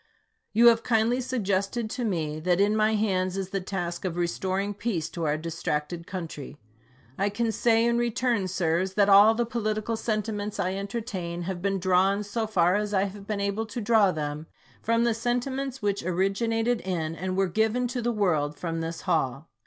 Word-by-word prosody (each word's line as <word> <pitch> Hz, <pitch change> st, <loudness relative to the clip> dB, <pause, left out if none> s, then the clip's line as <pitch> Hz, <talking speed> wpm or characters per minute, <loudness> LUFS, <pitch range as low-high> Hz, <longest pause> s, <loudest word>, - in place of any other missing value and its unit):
You 230 Hz, +3 st, +4 dB
have 230 Hz, -1 st, +3 dB
kindly 230 Hz, +2 st, +2 dB
suggested 215 Hz, -2 st, -1 dB
to 250 Hz, -, -3 dB
me 160 Hz, -8 st, -2 dB
that 175 Hz, +2 st, +1 dB
in 205 Hz, +2 st, +3 dB
my 215 Hz, 0 st, +3 dB
hands 190 Hz, -3 st, 0 dB
is 195 Hz, -1 st, -4 dB
the 195 Hz, -1 st, -1 dB
task 175 Hz, -2 st, -4 dB
of 180 Hz, -3 st, -3 dB
restoring 190 Hz, +3 st, -1 dB
peace 195 Hz, -7 st, -2 dB
to 170 Hz, -2 st, -4 dB
our 150 Hz, 0 st, +1 dB
distracted 165 Hz, 0 st, -3 dB
country. 165 Hz, -6 st, -6 dB, 0.6 s
I 200 Hz, +1 st, +2 dB
can 225 Hz, +3 st, -1 dB
say 230 Hz, 0 st, +3 dB
in 235 Hz, 0 st, +2 dB
return, 240 Hz, -3 st, 0 dB
sirs, 185 Hz, +1 st, 0 dB
that 205 Hz, -1 st, +4 dB
all 205 Hz, +3 st, +7 dB
the 240 Hz, +1 st, +1 dB
political 220 Hz, -1 st, -2 dB
sentiments 215 Hz, -2 st, -3 dB
I 185 Hz, -1 st, 0 dB
entertain 195 Hz, -4 st, -4 dB
have 180 Hz, 0 st, -4 dB
been 195 Hz, +1 st, 0 dB
drawn, 190 Hz, +2 st, +2 dB
so 220 Hz, +2 st, -2 dB
far 180 Hz, -4 st, +3 dB
as 210 Hz, 0 st, -2 dB
I 190 Hz, -, +3 dB
have 200 Hz, 0 st, -6 dB
been 210 Hz, -2 st, -2 dB
able 200 Hz, +3 st, -1 dB
to 220 Hz, -, -5 dB
draw 215 Hz, -3 st, +4 dB
them, 150 Hz, -1 st, -4 dB, 0.3 s
from 230 Hz, +1 st, +2 dB
the 235 Hz, -1 st, +2 dB
sentiments 250 Hz, +3 st, -2 dB
which 200 Hz, -1 st, 0 dB
originated 225 Hz, +6 st, 0 dB
in 165 Hz, -4 st, -2 dB
and 185 Hz, +3 st, -3 dB
were 195 Hz, 0 st, +3 dB
given 220 Hz, +6 st, +1 dB
to 250 Hz, 0 st, -3 dB
the 240 Hz, +1 st, 0 dB
world 160 Hz, -9 st, 0 dB
from 165 Hz, -2 st, -3 dB
this 165 Hz, 0 st, -4 dB
hall. 155 Hz, -4 st, -1 dB
200 Hz, 185 wpm, -27 LUFS, 175-225 Hz, 0.6 s, all